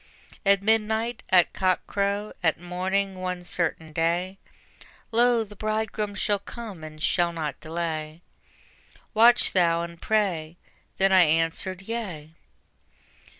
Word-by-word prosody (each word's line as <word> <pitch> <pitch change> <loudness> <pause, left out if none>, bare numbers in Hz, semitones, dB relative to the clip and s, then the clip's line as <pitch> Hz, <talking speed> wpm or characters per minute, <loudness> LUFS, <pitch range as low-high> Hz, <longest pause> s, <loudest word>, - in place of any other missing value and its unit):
At 200 0 +4
midnight, 220 +2 +1
at 180 -2 +4
cock 185 -1 +1
crow, 200 +1 -1
at 165 -2 +1
morning, 185 +2 -2
one 180 -1 -3
certain 165 -3 -1
day 175 +4 -1 0.7
Lo, 235 0 +3
the 210 -1 -13
Bridegroom 215 0 -2
shall 205 0 0
come 205 -5 -9
and 155 0 -9
shall 175 +2 +1
not 155 -4 -4
delay: 160 0 -4 0.9
Watch 235 +2 +5
thou 170 -2 +3
and 170 0 -9
pray. 175 -7 0 0.4
Then 195 0 +3
I 190 -1 +7
answered: 165 +3 +1
Yea. 190 -9 -5
185 Hz, 120 wpm, -26 LUFS, 165-210 Hz, 0.9 s, I